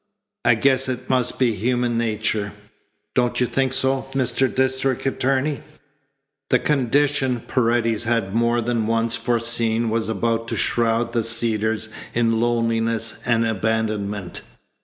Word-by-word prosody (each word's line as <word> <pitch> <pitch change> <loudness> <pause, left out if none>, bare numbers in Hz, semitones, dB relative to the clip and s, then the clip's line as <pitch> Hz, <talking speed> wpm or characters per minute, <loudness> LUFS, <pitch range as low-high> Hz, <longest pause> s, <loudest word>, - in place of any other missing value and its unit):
"I 120 - +5
guess 130 +2 +2
it 130 0 -4
must 130 -2 0
be 125 -3 +2
human 120 +3 0
nature. 110 -2 -1 0.6
Don't 125 -1 +1
you 125 - +3
think 135 +1 0
so, 135 0 0
Mr. 130 0 +1
District 130 0 0
Attorney?" 135 +2 0 0.9
The 125 - +5
condition 135 -1 +1
Paredes 115 -2 0
had 115 -4 0
more 120 +1 +2
than 115 -2 -1
once 115 0 +1
foreseen 115 -1 +1
was 110 0 -1
about 115 +2 -1
to - - -3
shroud 115 0 +1
the 115 -2 +1
Cedars 110 -1 0 0.3
in 115 -1 +2
loneliness 115 -1 0
and 115 -1 +2
abandonment. 105 -3 -2
115 Hz, 130 wpm, -22 LUFS, 115-125 Hz, 0.9 s, I